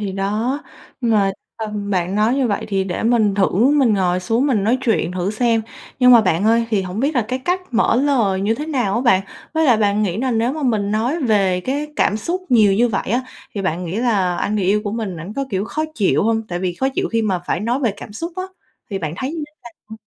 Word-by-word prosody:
thì 200 -2 -3
đó! 215 +9 -1 0.4
Nhưng 240 -2 0
mà, 200 -2 +3 0.3
ừm, 210 -2 -4
bạn 185 -1 0
nói 215 +4 +2
như 270 -2 +1
vậy 200 - -1
thì 195 -2 0
để 180 -2 -3
mình 225 -3 +2
thử 195 -1 +3 0.2
mình 270 -7 +3
ngồi 180 -2 +1
xuống, 230 +8 +1
mình 225 -8 +1
nói 235 +5 +2
chuyện 220 -8 0
thử 185 +2 -1
xem. 225 0 +1 0.4
Nhưng 250 -1 +6
mà 235 - +8
bạn 185 -2 +1
ơi, 230 +1 +3
thì 205 -3 +1
hổng 185 +3 -4
biết 285 +4 0
là 245 - +2
cái 255 - -1
cách 355 +8 -1
mở 230 - +3
lời 240 -8 +2
như 210 +3 +1
thế 295 +6 -5
nào 250 -11 0
á 235 - +1
bạn? 235 -7 +4 0.3
Với 320 0 +2
lại 250 -6 +5
bạn 210 -1 +1
nghĩ 190 -4 -1
là 260 +1 0
nếu 230 +2 +1
mà 310 0 -5
mình 215 -6 0
nói 240 +10 0
về 195 -6 +2
cái 280 +8 -2
cảm 210 - +2
xúc 345 - -3
nhiều 215 -5 +5
như 240 +4 +3
vậy 195 -3 -2
á, 245 +3 +1 0.3
thì 200 - -3
bạn 180 0 -2
nghĩ 175 +3 -4
là 200 -7 +1
anh 210 - -1
người 200 - 0
yêu 205 +3 +2
của 205 - -2
mình 215 -6 -3
ảnh 165 +5 -7
có, 275 - -1
kiểu, 195 -1 -1
khó 310 +7 -2
chịu 205 -8 +2
hông? 225 +1 +1
Tại 175 - -3
vì 180 -1 -2
khó 265 - 0
chịu 270 - -2
khi 230 -1 0
mà 195 -4 0
phải 175 - -1
nói 240 +6 -1
về 235 -6 +1
cảm 205 - -10
xúc 335 +11 -5
á, 370 - -2 0.5
thì 195 - -2
bạn 160 -3 -4
thấy 260 +7 -3
như 320 -2 -4
thế - - -29 0.4
nào? 220 - -7
220 Hz, 265 wpm, -19 LUFS, 195-250 Hz, 0.5 s, mà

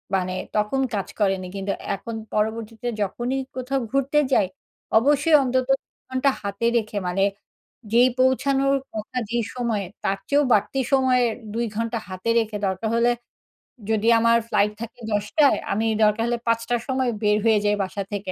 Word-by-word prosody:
মানে 185 -1 -1 0.2
তখন 210 +5 +1
কাজ 200 -2 -2
করেনি। 195 -3 +1
কিন্তু 195 0 -2 0.2
এখন 225 +4 -7 0.2
পরবর্তীতে 220 +2 -2
যখনই 240 +7 -1 0.2
কোথাও 260 +1 -1
ঘুরতে 275 +2 +2
যাই, 200 - +4 0.5
অবশ্যই 290 +6 +4
অন্তত 255 0 0 0.4
ঘন্টা 260 +2 +1
হাতে 200 +2 -3
রেখে 215 -2 -2
মানে, 185 +2 +1 0.7
যেই 245 +2 +6
পৌঁছানোর 270 +1 +3 0.2
কথা 220 +4 -5
যেই 235 0 0
সময়ে, 230 -5 -1 0.2
তার 195 0 0
চেয়েও 290 +1 +4
বাড়তি 210 +6 +1
সময়ের 255 -3 +3 0.2
২ 235 +1 0
ঘন্টা 230 +1 -1
হাতে 185 +4 -4
রেখে, 220 -2 -2
দরকার 190 +4 -2
হলে 240 +1 +4 0.8
যদি 220 0 +1
আমার 230 0 +4
ফ্লাইট 210 -2 +2
থাকে 235 +2 -8
১০ঃ০০ 210 +9 +1
য় - - 0
আমি 220 +3 0 0.2
দরকার 210 +1 +3
হলে 240 0 0
৫ঃ০০ 230 +1 +1
র - - -8
সময় 260 -2 +1
বের 210 0 +4
হয়ে 220 -2 +5
যাই 205 0 +3
বাসা 195 +1 -4
থেকে। 200 -2 -3
230 Hz, 160 wpm, -23 LUFS, 210-255 Hz, 0.8 s, যেই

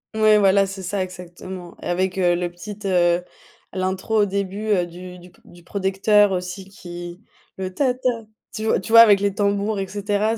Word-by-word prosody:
Ouais, 215 -1 +5
voilà, 195 -1 +4
c'est 195 0 -7
ça, 195 +2 -2
exactement 180 0 -9
avec, 185 +1 -1
heu, 175 -1 +3
le 175 0 -3
petite, 205 +4 -9
heu, 175 -2 +2 0.5
l'intro 190 +3 0
au - - +4
début, 200 +1 -3
heu, 180 -3 +2
du 180 +1 -10
du 180 0 -15
p - - -26
du 175 0 -17
producteur 200 +2 +2
aussi 180 +1 -4
qui 175 -2 -9 0.4
le 190 -1 -5
«ta 255 +2 +1
ta», 255 0 0 0.4
tu 220 +1 -4
v - - +2
tu - - -8
vois? 230 - +9
Avec 210 -3 +7
les 200 -1 +1
tambours 200 +1 0
et 195 - -3
cetera. 205 +2 -1
190 Hz, 190 wpm, -22 LUFS, 180-205 Hz, 0.5 s, vois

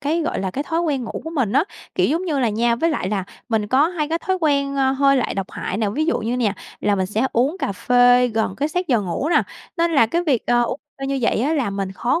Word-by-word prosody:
cái, 310 +4 0
gọi 315 - -2
là, 190 - -2
cái 280 +10 -3
thói 330 +2 -1
quen 285 -7 -1
ngủ - - -5
của 320 - -5
mình 260 -11 0
á. - - +3 0.3
Kiểu - - +2
giống 335 +6 0
như 300 -6 -1
là 245 -3 +2
nha 235 +2 +1
với 330 +6 +1
lại 240 -11 -2
là 195 -2 -1 0.2
mình 220 -2 0
có 275 +8 +3
hay 310 -5 -2
có 330 +1 0
thói 375 +1 -1
quen, 280 -2 +1
ơ, 265 -1 +3
hơi 275 0 +3
lại 255 - -1
độc 195 -1 -4
hại 190 - -4
nè. 215 -2 0
Ví 310 +8 -1
dụ 335 - +1
như 235 +3 -2
nè, 225 -5 +1 0.3
là 205 -1 +2
mình 190 -1 0
sẽ 220 +6 0
uống 270 +9 +1
cà 200 - -2
phê 245 +4 +4
gần 220 -4 -1
cái 290 +2 0
sát 360 +3 -2
giờ 240 -4 +3
ngủ 200 - -2
nè, - - +4 0.3
nên 335 0 +1
là 230 -7 +5
cái 340 +9 0
việc, 280 -9 0
ờ, 240 0 +3
uống 250 - -3 0.2
phê 270 - -2
như 275 0 -1
vậy 225 - +2
á, 290 +6 +1
là 255 -9 0
mình 195 -1 -3
khó 245 - 0
260 Hz, 290 wpm, -21 LUFS, 220-305 Hz, 0.3 s, là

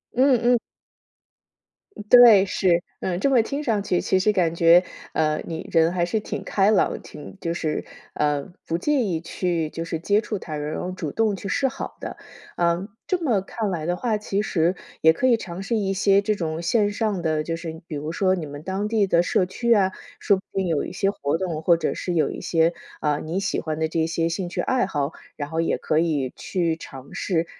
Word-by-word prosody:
嗯 260 0 +4
嗯。 245 0 +4 1.5
对， 235 -6 +9
是， 180 -3 +2 0.2
嗯。 180 -1 -2
这 275 - +2
么 255 -4 +5
听 280 +6 -4
上 220 -7 0
去， 180 -3 0
其 190 - +2
实 210 +3 +3
感 170 -4 +1
觉， 170 +1 +6 0.3
呃， 155 -1 +1
你 165 -1 -6
人 165 0 +4
还 175 -1 0
是 215 +5 -1
挺 210 - -5
开 200 +1 +2
朗， 215 - +2
挺 150 +6 -11
就 165 -2 -2
是 155 -3 -2 0.3
呃， 150 +2 0
不 165 - -1
介 295 +11 +1
意 180 -8 -1
去 170 -1 -2
就 165 +1 -5
是 165 -1 -3
接 200 +5 +2
触 210 -3 -4
他 155 -4 -6
人， 150 0 -3
然 - - -3
后 180 - -3
主 165 -5 -5
动 220 -2 +1
去 195 - -7
示 270 +8 +1
好 265 - -6
的。 - - -6 0.4
嗯， 175 +3 +1 0.2
这 370 - 0
么 230 -10 +2
看 210 +2 -3
来 165 -5 -3
的 175 +1 0
话， 220 +2 0
其 205 -1 -2
实， 175 -4 +1 0.3
也 160 0 +6
可 255 +10 +1
以 240 -2 +5
尝 185 -4 -7
试 210 +4 -1
一 195 -3 0
些 195 +1 +4
这 210 +1 +1
种 160 -3 -3
线 205 +3 +2
上 205 -3 -1
的， 155 -2 0
就 165 +1 -3
是 165 -1 -7
比 155 - -5
如 150 +2 -4
说 185 +1 +2
你 170 -4 -4
们 145 +1 -9
当 190 +3 -2
地 215 -2 +2
的 170 -3 +3
社 180 +1 +1
区 235 +6 -2
啊， 195 -3 +3 0.3
说 200 - +3
不 190 - -11
定 190 -1 +1
有 160 -4 0
一 - - -6
些 195 +2 0
活 145 -5 -1
动， 165 -4 -3
或 170 +1 +4
者 160 - -1
是 180 - -3
有 160 - +2
一 - - -7
些， 165 0 +2 0.3
啊， 150 -1 +1
你 165 +4 -3
喜 195 - -1
欢 155 -1 -3
的 160 - +1
这 160 0 0
些 165 0 0
兴 175 +1 -3
趣 - - -2
爱 260 -1 +1
好， 145 -4 -1 0.2
然 145 -1 -5
后 160 +1 0
也 165 - 0
可 155 - 0
以 150 -6 0
去 170 -4 -1
尝 135 -4 -11
试。 170 -3 0
175 Hz, 240 characters per minute, -24 LUFS, 160-205 Hz, 1.5 s, 对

